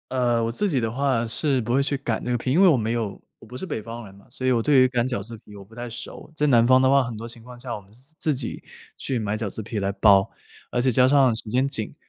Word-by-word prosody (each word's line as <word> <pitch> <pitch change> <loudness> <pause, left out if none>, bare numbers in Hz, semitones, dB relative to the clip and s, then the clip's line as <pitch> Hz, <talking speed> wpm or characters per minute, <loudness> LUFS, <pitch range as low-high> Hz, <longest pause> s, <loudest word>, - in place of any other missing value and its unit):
呃， 120 -3 +1
我 115 - -1
自 205 - -1
己 135 -7 0
的 115 -1 -1
话， 130 -2 0
是 130 +3 0
不 120 +2 -2
会 135 - +3
去 140 +1 0
擀 120 -5 -3
那 125 - -1
个 120 - +1
皮。 130 +2 -3
因 165 +8 +4
为 195 - +7
我 165 - +6
没 110 -2 -1
有 115 -4 -3 0.2
我 - - -15
不 125 - -11
是 130 - -5
北 145 - -4
方 115 +2 -8
人 95 - -13
嘛， 100 +1 -19
所 130 +1 -6
以 130 - +3
我 120 -2 +2
对 140 +1 +4
于 130 - +6
擀 125 -1 0
饺 125 -6 -3
子 115 +2 -10
皮 105 -1 -16
我 100 - -10
不 100 +3 -20
太 120 +1 -6
熟。 120 +5 -9
在 150 - 0
南 120 -4 +4
方 130 0 +6
的 130 - +4
话， 140 0 +5
很 125 -3 -4
多 115 +2 -7
情 120 0 -10
况 125 +1 -12
下， 120 -1 -6
我 - - -5
们 100 0 -21
是 130 +7 -15
自 155 -3 0
己 125 -2 -5 0.4
去 130 - -3
买 105 -1 -2
饺 110 -2 -3
子 110 - -7
皮 110 +1 -4
来 100 0 -1
包。 100 0 +4 0.4
而 125 - 0
且 130 +1 +2
加 125 +2 +4
上 135 -3 +4
时 110 -1 -1
间 130 +4 +1
紧。 115 -6 -4
120 Hz, 340 characters per minute, -24 LUFS, 110-130 Hz, 0.4 s, 为